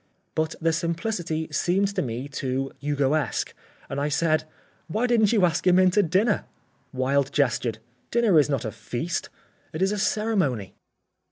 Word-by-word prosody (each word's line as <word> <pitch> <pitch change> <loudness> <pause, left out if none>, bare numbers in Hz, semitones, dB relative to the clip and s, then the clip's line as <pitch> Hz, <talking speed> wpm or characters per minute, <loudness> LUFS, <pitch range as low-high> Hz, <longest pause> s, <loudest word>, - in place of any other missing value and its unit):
But 160 +1 -1
the 165 0 +1
simplicity 170 -1 -2
seemed 185 +6 +1
to - - 0
me 125 +2 -4
too 135 -1 -3
Hugoesque 145 +1 0 0.3
and 140 +1 -3
I 145 - 0
said: 155 +1 +1 0.4
"Why 215 +9 0
didn't 230 -4 +3
you 210 -6 +4
ask 175 +1 0
him 180 0 +6
in 185 -1 +5
to 205 - +4
dinner?" 200 +5 +1 0.5
Wilde 135 +1 +1
gestured. 120 -5 +1 0.3
"Dinner 225 -8 +4
is 150 - +3
not 140 -3 -1
a 110 - -2
feast, 120 - -4 0.4
it 155 - -4
is 195 - +2
a 210 - -2
ceremony." 190 - 0
160 Hz, 160 wpm, -25 LUFS, 140-190 Hz, 0.5 s, him